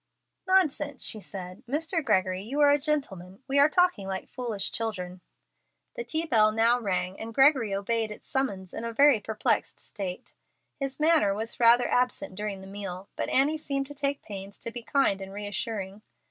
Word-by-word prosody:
"Nonsense," 300 -7 +1
she 220 - +1
said. 185 -2 -8
"Mr. 325 +4 -1
Gregory, 185 -5 +1
you 255 +8 -4
are 290 -1 +7
a 290 - +3
gentleman. 240 - -3
We 280 +1 +2
are 285 +2 +7
talking 355 - +2
like 190 0 -4
foolish 225 -6 -3
children." 185 -5 -4 0.7
The 485 - -3
tea 320 -6 -1
bell 220 -8 +4
now 230 +3 +3
rang, 190 -3 -2
and 225 0 -7
Gregory 270 -7 +4
obeyed 220 +3 -1
its 210 - -10
summons 195 -9 -2
in 225 - -5
a 230 - -3
very 275 -1 +5
perplexed 215 0 -1
state. 190 -4 -7 0.5
His 275 0 -4
manner 305 -11 +4
was 220 +2 -4
rather 240 +1 +6
absent 250 +2 0
during 205 0 -4
the - - -10
meal, 195 -1 -7
but - - -2
Annie 295 +4 +2
seemed 275 -2 -2
to 290 - -8
take 280 0 -2
pains 200 -1 -8
to 230 - -4
be 240 +1 -5
kind 230 -6 +1
and 195 0 -7
reassuring. 205 0 -4
225 Hz, 180 wpm, -27 LUFS, 195-280 Hz, 0.7 s, are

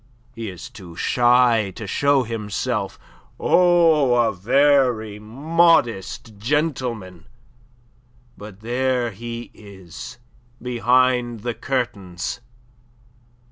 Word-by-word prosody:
He 115 -3 -6
is 90 -2 -9
too 95 -8 -12
shy 120 -3 +3
to 110 - -7
show 140 +6 +2
himself 110 -3 -3 0.4
oh, 165 -7 +4
a 115 -2 +2
very 125 -1 +2
modest 120 - +1
gentleman. 120 - -2 1.1
But 105 -1 -12
there 125 +1 0
he 115 +3 -7
is 100 +4 -11 0.4
behind 125 -1 +1
the 120 +2 -3
curtains. 120 -6 -3
120 Hz, 85 wpm, -22 LUFS, 105-130 Hz, 1.1 s, oh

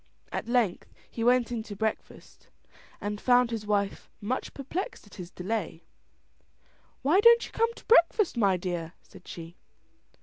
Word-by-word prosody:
At - - -4
length 235 -7 0 0.2
he 230 - -4
went 245 0 +3
in 235 -2 -2
to 210 -2 -8
breakfast, 220 +1 -5 0.5
and 205 0 -4
found 245 -1 +4
his 215 -2 -4
wife 200 -1 -1
much 245 +6 -3
perplexed 335 - -5
at 205 - -19
his 180 -2 -8
delay. 180 -3 -4 1.2
"Why 315 +8 +4
don't 470 +2 +6
you - - -12
come 460 +1 +1
to - - -15
breakfast, 415 - +4
my 200 -5 +3
dear?" 175 -2 -4
said 185 - -17
she. 170 +1 -9
220 Hz, 155 wpm, -28 LUFS, 190-255 Hz, 1.2 s, don't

